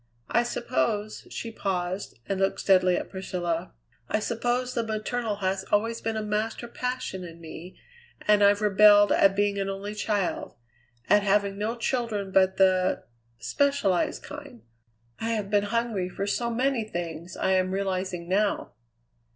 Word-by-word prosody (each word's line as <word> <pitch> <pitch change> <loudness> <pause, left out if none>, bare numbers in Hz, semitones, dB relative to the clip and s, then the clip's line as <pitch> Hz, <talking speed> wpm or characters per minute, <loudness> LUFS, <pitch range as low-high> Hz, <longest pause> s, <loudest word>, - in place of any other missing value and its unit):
I 235 - +4
suppose" 230 -3 -2
she 230 - -5
paused 185 - -3
and 195 -1 -1
looked 195 - +1
steadily 185 -2 +4
at - - -5
Priscilla 180 -2 -3 0.4
"I - - +2
suppose 245 +3 -1
the 235 - 0
maternal 220 0 -2
has 190 0 0
always 225 +3 +1
been 225 -1 -2
a 215 - -2
master 215 +3 -2
passion 250 -6 -4
in 170 -1 -10
me, 165 +2 -10 0.5
and 210 -1 +5
I've 205 +1 +4
rebelled 205 0 +6
at 195 0 +5
being 200 0 +1
an 195 0 -1
only 195 +2 -4
child; 205 -3 -2 0.5
at 205 - +5
having 200 0 +2
no 220 +3 -1
children 230 -5 -2
but 190 0 +3
the 185 -1 +3 0.3
specialized 280 - +1
kind. 285 -5 -10 0.6
I 230 +1 -1
have 210 -3 -3
been 205 -1 +3
hungry 220 -4 -1
for 195 +2 -3
so 235 +4 -1
many 250 0 +1
things 175 -3 -6
I 190 - +1
am 185 -1 +2
realizing 185 -2 -2
now." 200 +3 0
205 Hz, 150 wpm, -27 LUFS, 190-225 Hz, 0.6 s, rebelled